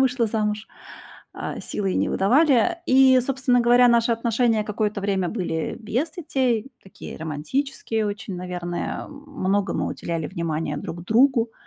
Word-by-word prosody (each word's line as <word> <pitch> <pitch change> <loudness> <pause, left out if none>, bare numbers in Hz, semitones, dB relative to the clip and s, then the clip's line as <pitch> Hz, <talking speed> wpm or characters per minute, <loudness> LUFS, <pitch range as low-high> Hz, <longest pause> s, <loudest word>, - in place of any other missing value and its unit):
вышла 255 -3 +2
замуж, 215 0 -2 0.7
а - - -5
силой 195 -2 -3
не - - +1
выдавали. 280 - +3
И, 260 -1 +6
собственно 255 -1 +1
говоря, 245 +1 +5
наши 235 0 +3
отношения 230 -1 +1
какое-то 210 -1 -2
время 195 -2 0
были 170 -5 -3
без 245 +8 -2
детей, 265 -7 -1
такие 195 - -10
романтические 220 - -2
очень, 205 -1 -5
наверное. 175 -1 -4
Многому 275 - -2
уделяли 165 -2 -4
внимания 165 -4 -3
друг 170 +3 -6
другу. 235 +1 +3
225 Hz, 130 wpm, -23 LUFS, 190-260 Hz, 0.7 s, И